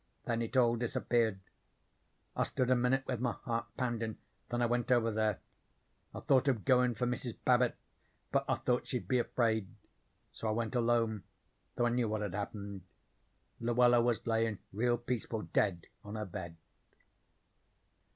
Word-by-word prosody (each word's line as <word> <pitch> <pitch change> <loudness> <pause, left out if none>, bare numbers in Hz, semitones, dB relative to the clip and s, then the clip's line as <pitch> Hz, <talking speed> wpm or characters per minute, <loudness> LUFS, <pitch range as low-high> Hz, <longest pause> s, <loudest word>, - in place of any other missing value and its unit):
Then 115 -1 0
it 115 +3 -2
all 120 -2 +4
disappeared. 115 -3 +1 1.0
I - - 0
stood 130 0 0
a - - +6
minute 125 +2 +2
with 125 -4 -2
my 125 -1 0
heart 115 -1 -3
poundin', 115 -4 -2 0.3
then 120 0 0
I - - +4
went 120 +1 0
over 115 -2 +4
there. 110 -2 +1 0.8
I - - -5
thought 135 0 +3
of 125 -7 +1
goin' 125 -2 +4
for 125 - -1
Mrs. 125 -1 -3
Babbit, 125 -1 +4 0.6
but - - +2
I - - +3
thought 125 0 0
she'd 125 - -3
be 125 - +2
afraid. 110 -4 +1 0.6
So 115 - -5
I - - +2
went 115 +2 -2
alone, 115 -3 +2 0.5
though 120 - +2
I - - +3
knew 120 -2 +1
what 110 0 -1
had 100 - -3
happened. 100 -1 -5 0.8
Luella 120 +1 +4
was 115 -1 0
layin' 115 -2 +1 0.2
real 120 +3 +2
peaceful, 120 -2 -3
dead 90 -5 0 0.2
on 105 +1 -7
her 105 -1 -3
bed." 85 -3 -7
120 Hz, 160 wpm, -33 LUFS, 110-125 Hz, 1.0 s, a